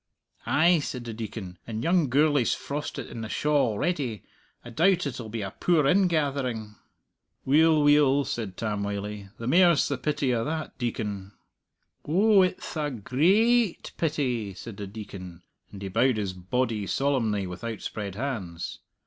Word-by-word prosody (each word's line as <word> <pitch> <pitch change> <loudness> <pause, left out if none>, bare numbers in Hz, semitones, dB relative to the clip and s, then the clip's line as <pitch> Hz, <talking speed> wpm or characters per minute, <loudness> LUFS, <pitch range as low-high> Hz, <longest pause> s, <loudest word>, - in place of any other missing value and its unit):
"Ay," 170 +2 +4
said 125 -4 -5
the 115 - -5
Deacon, 105 -5 -7
"and 110 0 -4
young 170 -3 +2
Gourlay's 145 -1 +3
frostit 145 +1 -5
in 115 - -7
the 110 - -5
shaw 145 -1 +2
already. 130 - -2 0.4
I 120 - -8
doubt 175 +6 +3
it'll 120 -5 -5
be 110 -1 -4
a 95 - -5
poor 165 -5 +2
ingathering." 140 - +1 0.7
"Weel, 155 +2 +5
weel," 145 -1 +4
said 105 -6 -4
Tam 105 -2 -2
Wylie, 100 0 -4
"the 115 - -7
mair's 170 +3 +5
the 140 -3 -2
pity 145 -3 0
o' 115 -1 0
that, 155 +2 -4
Deacon." 105 -5 -3 0.7
"Oh, 200 +6 +4
it'th 185 -1 -1
a 150 -1 0
grai 190 - +3
ait - - -11
pity," 125 - -1
said 105 +2 -9
the 100 - -5
Deacon, 95 -4 -9 0.3
and 100 -1 -9
he - - -3
bowed 115 +5 +2
his 100 -3 -2
body 105 +3 -2
solemnly 115 -8 0
with 90 +4 -8
outspread 105 -3 -5
hands. 100 -10 -4
125 Hz, 155 wpm, -27 LUFS, 105-150 Hz, 0.7 s, Weel